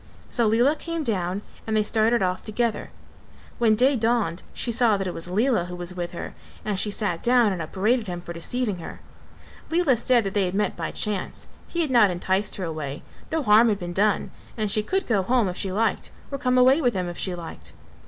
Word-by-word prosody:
So 235 -2 +2
Lela 240 +7 +3
came 335 +1 -4
down 195 -4 -2 0.2
and 220 0 +1
they 215 - +3
started 220 +1 +2
off 185 0 -1
together; 230 0 -2 0.7
when 225 -2 +4
day 260 +5 +3
dawned 225 -7 0
she 240 - -2
saw 230 -3 +3
that 195 - -3
it 180 - -3
was 165 +1 -4
Lela 215 0 +2
who 180 0 -7
was 175 0 -5
with 175 -1 -4
her - - -6 0.3
and 205 -3 -1
she 210 - +1
sat 200 -5 -1
down 240 -4 +4
and 180 - -4
upbraided 215 +8 0
him 175 -1 -4
for 175 0 -8
deceiving 205 +3 -2
her. - - -8 0.7
Lela 330 -5 +3
said 240 +1 +2
that 195 -1 -3
they 200 -2 +2
had 180 +1 -3
met 210 - 0
by - - -3
chance; 210 -3 -3 0.2
he 340 - -2
had 305 -5 0
not 235 -5 +6
enticed 190 +3 0
her 190 - -4
away, 155 -3 -5 0.3
no 320 -2 0
harm 220 +1 +6
had 205 - +1
been 175 -2 -6
done 205 +2 +1 0.3
and 215 -2 -1
she 215 - +2
could 380 - -1
go 215 -5 +2
home 235 +2 +2
if 180 - -3
she 190 - -2
liked 220 +4 0 0.2
or 275 - -3
come 255 0 +1
away 260 +5 +5
with 245 -6 +1
him 180 -1 -1
if 175 - -6
she 185 -2 -1
liked. 80 - -9
210 Hz, 220 wpm, -24 LUFS, 180-240 Hz, 0.7 s, not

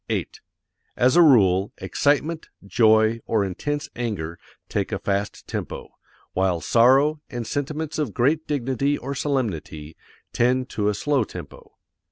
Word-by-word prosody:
As 125 +4 +3
a 175 - +7
rule, 100 - +4
excitement, 145 - 0 0.2
joy, 110 +2 +3
or 105 -3 +1
intense 145 +11 -3
anger 100 -9 -4 0.3
take - - -2
a - - -1
fast 100 +1 -3
tempo, - - -5 0.4
while 95 -2 +1
sorrow, 135 - +4
and 120 -3 -5
sentiments 150 +4 -3
of 145 -8 -1
great 150 +9 +1
dignity 140 0 0
or 135 +2 -5
solemnity 100 - -3 0.4
tend 125 +2 +1
to 105 -1 0
a 105 - -1
slow 145 -1 +1
tempo. - - -11
120 Hz, 130 wpm, -23 LUFS, 100-145 Hz, 0.4 s, a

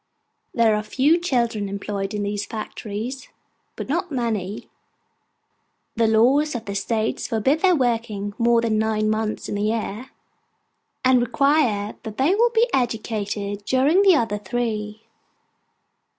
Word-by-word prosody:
There 230 -2 +4
are 210 - +1
a - - -5
few 290 +9 +2
children 235 - 0
employed 200 0 -4
in 205 - -2
these 205 0 -3
factories, 220 +4 -6 0.5
but - - -6
not 340 +4 -2
many. 220 -6 -3 1.3
The 230 -1 +2
laws 260 +7 +3
of 230 -1 -5
the 200 - -4
State 215 +2 -1
forbid 250 +7 0
their 365 0 +4
working 225 -6 -1
more 235 0 +4
than 220 -2 +1
nine 215 -1 +1
months 215 0 -2
in - - -4
the 205 - -2
year, 220 +3 -2 1.0
and 255 -1 +5
require 245 -5 +1
that 220 -2 -8
they 280 +8 +3
be 470 +2 +3
educated 210 -4 -2
during 275 - +3
the 390 -3 +6
other 225 -6 0
three. 215 0 -3
225 Hz, 135 wpm, -22 LUFS, 210-260 Hz, 1.3 s, the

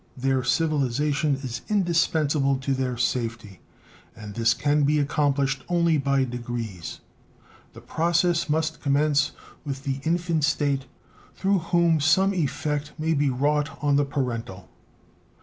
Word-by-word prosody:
Their 130 0 0
civilization 145 0 +1
is 120 -2 -5
indispensable 160 -8 +1
to 135 +1 -2
their 130 -2 -2
safety, 115 -5 -2 0.6
and 105 -1 -9
this 115 +1 +2
can 145 +3 +1
be 145 +1 +3
accomplished 140 -2 0
only 170 -3 +2
by 140 -1 +2
degrees. 120 -7 -5 0.7
The - - -12
process 170 0 +1
must 160 +1 -1
commence 145 0 +2 0.3
with 135 -2 -5
the 135 -2 -2
infant 170 -1 0
state, 140 -2 0 0.5
through 195 0 +1
whom 170 -2 +3
some 190 +7 +3
effect 150 -2 -2
may 160 +1 0
be 145 -2 +2
wrought 145 +3 0
on 145 -1 +3
the 145 - +3
parental. 115 -9 -4
145 Hz, 130 wpm, -25 LUFS, 130-155 Hz, 0.7 s, be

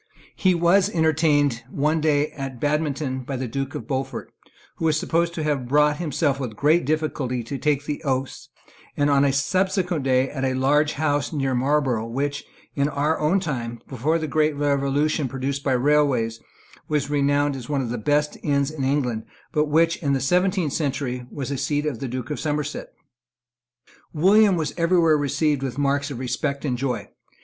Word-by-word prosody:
He 185 -2 +2
was 180 +4 +3
entertained 150 - +2
one 150 +4 0
day 150 -1 +2
at 135 -3 -6
Badminton 145 -2 -1
by 130 +2 -5
the 130 0 -3
Duke 135 +4 -4
of - - -5
Beaufort, 135 -1 -4 0.5
who 165 - -2
was 155 -1 +3
supposed 170 +1 0
to 160 - -2
have 145 -5 -1
brought 150 +2 +3
himself 150 -4 0
with 125 -5 -4
great 155 +7 +3
difficulty 145 -5 -1
to 135 +4 -5
take 145 -2 0
the 150 -1 -4
oaths, 135 -2 -3 0.5
and 145 0 +2
on 140 0 +4
a 140 - +3
subsequent 180 +3 0
day 130 0 +2
at 135 -1 -5
a 130 -1 0
large 145 +3 +2
house 145 -2 0
near 135 -4 -1
Marlborough 130 -3 +1
which, 140 +4 -2 0.3
in 140 0 +1
our 150 +2 0
own 155 +6 +2
time, 120 -9 -4
before 145 +6 0
the 160 - -3
great 155 0 +1
revolution 145 +1 +1
produced 135 +2 -3
by 135 - +1
railways, 130 -4 +2 0.5
was 145 -2 -1
renowned 145 0 +2
as 125 -1 -8
one 140 -2 0
of 120 - -4
the 120 - -3
best 150 +5 0
inns 140 0 +1
in 150 -3 -4
England, 130 -5 0 0.3
but 150 0 +2
which, 165 +3 +3
in 140 -3 -1
the 135 - +1
seventeenth 180 +3 +1
century, 130 -4 -2
was 140 0 -5
a 140 - -2
seat 145 +2 -1
of 140 -7 -2
the 135 - -4
Duke 125 +3 -5
of 150 - -3
Somerset. 150 0 -3 1.2
William 195 +4 +5
was 155 -3 -2
every 170 +2 +2
where 165 -2 +4
received 145 0 0
with 130 -2 -4
marks 140 0 0
of 140 - -6
respect 140 +3 -2
and 130 -4 0
joy. 125 -4 -2
145 Hz, 185 wpm, -23 LUFS, 135-155 Hz, 1.2 s, William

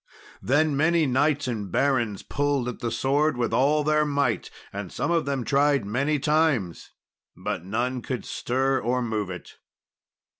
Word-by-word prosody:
Then 145 +3 +2
many 160 +3 +3
knights 145 +2 +1
and 105 -6 -4
barons 120 -7 +1
pulled 145 -3 -1
at 125 - -5
the 120 - -2
sword 135 +5 +1
with 120 -2 -1
all 145 +5 +3
their 150 0 +3
might, 140 -5 0 0.2
and 100 -2 -6
some - - -2
of 165 -3 +1
them 135 -3 -2
tried 140 -4 +2
many 140 +8 0
times, 145 - 0 0.5
but - - -4
none 120 +6 -2
could 125 0 -4
stir 130 +2 0
or 125 +1 0
move 110 -4 -2
it. 90 -1 -9
135 Hz, 155 wpm, -25 LUFS, 115-145 Hz, 0.5 s, many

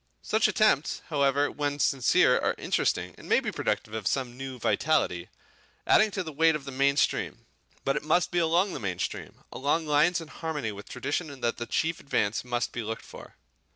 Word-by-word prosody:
Such 220 0 +2
attempts 185 -9 +2
however 145 -1 +2
when 145 -1 -2
sincere 135 -4 +3
are - - 0
interesting - - 0
and - - -12
may - - +5
be - - -3
productive 110 - -2
of 110 -3 -3
some 125 -3 -1
new 135 0 -6
vitality, 115 - 0 0.6
adding 215 0 +5
to 190 -2 -3
the 160 - -6
weight 160 +2 +3
of 145 -2 -6
the 135 - -6
main 140 +1 +2
stream. - - 0 0.4
But 135 +1 +1
it - - -4
must 165 +3 +2
be 175 - +1
along 170 +4 +2
the - - -4
main 95 -4 -3
stream, - - -5
along 145 +4 0
lines 155 +4 +3
in 165 - -9
harmony 150 -10 -4
with 100 0 -10
tradition 140 +2 -4
that 120 - 0
the 120 - -5
chief 165 0 -1
advance 110 -6 -1
must 120 -1 -2
be 120 - -4
looked 115 0 -5
for. - - -12
140 Hz, 195 wpm, -28 LUFS, 125-160 Hz, 0.6 s, may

